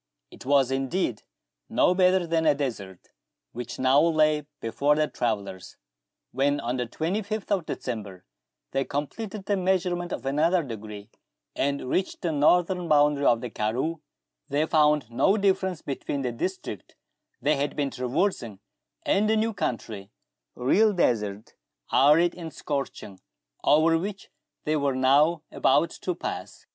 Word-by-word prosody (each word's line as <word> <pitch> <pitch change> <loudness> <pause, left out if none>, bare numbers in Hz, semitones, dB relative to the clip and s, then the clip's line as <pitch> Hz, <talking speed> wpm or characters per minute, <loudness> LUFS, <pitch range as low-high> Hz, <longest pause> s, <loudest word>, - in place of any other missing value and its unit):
It - - -13
was 135 -2 +3
indeed 135 - -1 0.5
no - - +3
better 185 -1 +3
than 165 -1 +1
a 150 - +5
desert 105 -10 -5 0.4
which 120 0 -7
now 130 +2 +4
lay 155 -2 +2
before 140 +6 +1
the 155 0 +1
travellers. 100 -8 -4 0.5
When, 140 +3 +1
on 120 +2 -2
the 125 -1 -2
25th 205 - -3
of 185 -5 0
December, 105 -7 -6 0.5
they 135 0 0
completed 195 +10 -5
the 205 - 0
measurement 180 -1 0
of - - -5
another 160 +6 +2
degree, 105 -5 -8 0.4
and 140 -1 -1
reached 185 +10 -2
the 170 - 0
northern 175 +4 +2
boundary 145 -2 +3
of 115 -1 +3
the 125 - -6
karroo, 130 +10 -2 0.5
they 145 +2 +1
found 150 -5 +2
no 195 - +3
difference 190 -4 0
between 140 0 -4
the 125 - -1
district 120 - -5 0.4
they 150 +2 +2
had 140 +1 -2
been 140 -2 -1
traversing 125 - -2 0.4
and 210 +2 +2
the 220 - +3
new 220 +1 0
country, 110 - -4 0.5
the 125 - -9
real 210 - +4
desert, 105 - -1 0.4
arid 160 +5 +5
and 165 -3 -9
scorching, 135 -9 -5 0.4
over 160 +2 +4
which 200 +2 -6 0.3
they 155 - 0
were 140 -3 0
now 145 +5 +3
about - - +2
to - - -4
pass. - - -6
145 Hz, 145 wpm, -26 LUFS, 125-175 Hz, 0.5 s, a